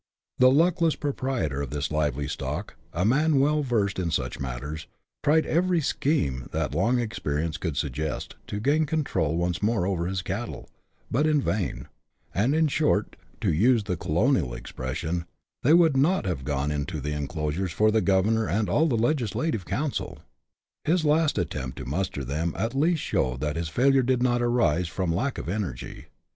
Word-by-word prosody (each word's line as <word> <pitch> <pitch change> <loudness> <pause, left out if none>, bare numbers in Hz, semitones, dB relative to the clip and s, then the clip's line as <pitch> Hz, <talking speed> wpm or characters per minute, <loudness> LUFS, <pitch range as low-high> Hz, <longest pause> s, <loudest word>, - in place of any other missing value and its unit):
The 130 0 +7
luckless 165 +3 +3
proprietor 130 - -2
of 70 - -4
this 75 +3 -3
lively 75 -2 0
stock, 75 - -4 0.2
a 90 +2 -1
man 145 +5 +3
well 150 +2 +3
versed 110 -8 0
in 90 -2 -1
such 65 -6 -2
matters, 70 +5 -5 0.4
tried 155 +2 +4
every 175 +1 +2
scheme 75 - 0
that - - -2
long 125 +2 +2
experience 80 -9 -2
could 80 -5 -3
suggest 75 +1 -3
to 105 - -4
gain 145 +8 +2
the - - +2
control 95 - 0
once 85 0 -1
more 105 -3 +1
over 90 -3 -1
his 95 -1 -2
cattle, 100 +6 -5 0.4
but 145 +6 +2
in 155 -1 +3
vain; 105 -8 -2 0.5
and, 120 +9 +2
in 160 0 +3
short, 145 -8 +1 0.3
to - - +2
use 115 +7 +4
the 90 -3 -2
colonial - - +1
expression, 80 +7 -4 0.2
" - - -65
they 150 +6 +5
would 165 -4 +5
not 150 - +2
have 85 -8 -2
gone 75 0 -1
into 75 +1 -3
the 75 +2 -3
enclosures 75 +4 -2
for 110 +5 +3
the 110 0 +3
governor 105 +3 +2
and 105 -2 0
all 155 - +3
the 125 -7 +1
legislative 120 - 0
council." 135 - -2 0.7
His 165 0 +2
last 150 0 +3
attempt 65 -7 -3
to 65 - -6
muster 75 +1 -2
them, 75 +6 -2
at 115 +6 -1
least 155 +3 +1
showed 65 0 0
that 75 0 -1
his 85 -1 -2
failure 135 +9 +4
did 125 0 +1
not 120 -1 +2
arise 115 -9 +2
from 85 0 -1
lack 125 +10 -1
of - - -5
energy. 90 - -4
100 Hz, 180 wpm, -26 LUFS, -, 0.7 s, The